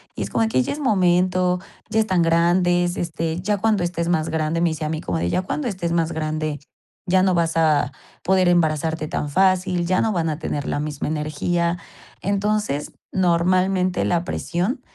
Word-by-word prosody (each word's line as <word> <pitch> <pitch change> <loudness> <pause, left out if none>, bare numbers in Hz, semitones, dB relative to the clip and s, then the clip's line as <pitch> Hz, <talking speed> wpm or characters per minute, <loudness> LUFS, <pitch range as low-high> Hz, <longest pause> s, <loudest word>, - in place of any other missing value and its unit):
Y - - -3
es - - -5
como - - 0
de 220 - +1
que: 130 - +2
"Ya - - -2
es 295 - -6
momento, 180 -6 +2 0.3
ya 220 0 +1
están 185 -5 +1
grandes, 175 +1 +2
este, 165 -1 -2
ya 205 +2 0
cuando 215 -4 +2
estés 170 -1 -2
más 160 -2 +1
grande", 160 +1 -1
me 175 - +3
dice 160 0 -5
a - - -2
mí, 155 0 -2
como 90 -1 -2
de: 85 +1 -1
"Ya 185 - 0
cuando 275 +8 -3
estés 180 -4 -3
más 165 -1 +1
grande, 155 -1 -2 0.5
ya 185 +1 +4
no 190 -1 +3
vas 165 -1 +1
a 150 -5 +3 0.3
poder 185 0 +3
embarazarte 160 -2 +1
tan 150 - -3
fácil, 185 +1 +2
ya 185 0 +2
no 225 - +1
van 165 -3 0
a 155 - -2
tener 145 -4 -3
la - - -1
misma 150 -1 -3
energía". 160 +3 -1 0.4
Entonces, 200 -6 -1 0.2
normalmente 185 +1 +2
la 170 -1 +1
presión 185 +10 -2
175 Hz, 195 wpm, -22 LUFS, 160-185 Hz, 0.5 s, ya